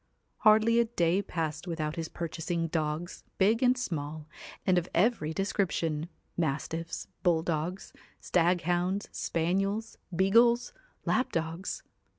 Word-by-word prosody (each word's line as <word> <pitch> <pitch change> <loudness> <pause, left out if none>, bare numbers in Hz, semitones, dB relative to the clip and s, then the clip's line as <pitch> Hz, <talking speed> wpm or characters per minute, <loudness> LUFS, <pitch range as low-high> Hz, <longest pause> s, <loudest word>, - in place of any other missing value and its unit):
Hardly 220 +2 +5
a 235 - +4
day 185 -5 +1
passed 160 -3 -3
without 155 -2 -2
his 165 -1 -4
purchasing 165 0 -3
dogs, 155 +2 -2
big 215 +5 +3
and 255 0 +4
small, 155 -9 -4 0.4
and 185 -2 +4
of 175 - -8
every 180 -5 +2
description, 170 -4 -1 0.3
mastiifs, 165 +2 -2 0.2
bull 170 -3 +3
dogs, 170 +3 -3 0.3
staghounds, 175 +2 +1
spaniels, 195 +6 -1 0.2
beagles, 235 - +4 0.3
lap 255 - +1
dogs. 165 +3 -3
175 Hz, 115 wpm, -30 LUFS, 160-200 Hz, 0.4 s, Hardly